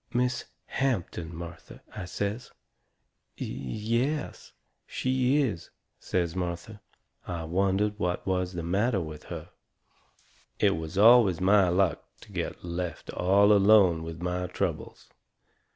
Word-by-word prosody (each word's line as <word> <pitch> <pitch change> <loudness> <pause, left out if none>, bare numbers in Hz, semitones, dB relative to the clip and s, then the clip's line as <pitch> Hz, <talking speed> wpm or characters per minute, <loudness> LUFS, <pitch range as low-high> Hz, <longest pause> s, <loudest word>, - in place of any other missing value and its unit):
"Miss 125 0 0 0.2
Hampton, 90 -10 -2
Martha," 85 0 -10
I 95 - -5
says. 100 +6 -4 0.9
"Y - - -2
y 105 - -2
y - - +3
es, 150 0 -3
s - - -17 0.3
sh - - -7
she 130 +1 +2
is," 105 -11 -3 0.3
says 85 -2 -1
Martha. 90 +4 -4 0.5
I 85 -2 -4
wondered 95 +5 0
what 90 -1 -1
was 90 -1 -1
the 85 -1 -4
matter 100 +6 +1
with 75 -3 -7
her. - - -8 1.1
It 100 -2 +3
is 80 +1 -5
always 110 -5 +6
my 95 0 +4
luck 90 0 +1 0.2
to - - -15
get - - -4
left 85 -1 -4
all 100 +3 +4
alone 100 -4 +5
with 80 +1 -7
my 90 0 -1
troubles. 90 - -4
95 Hz, 135 wpm, -28 LUFS, 85-105 Hz, 1.1 s, always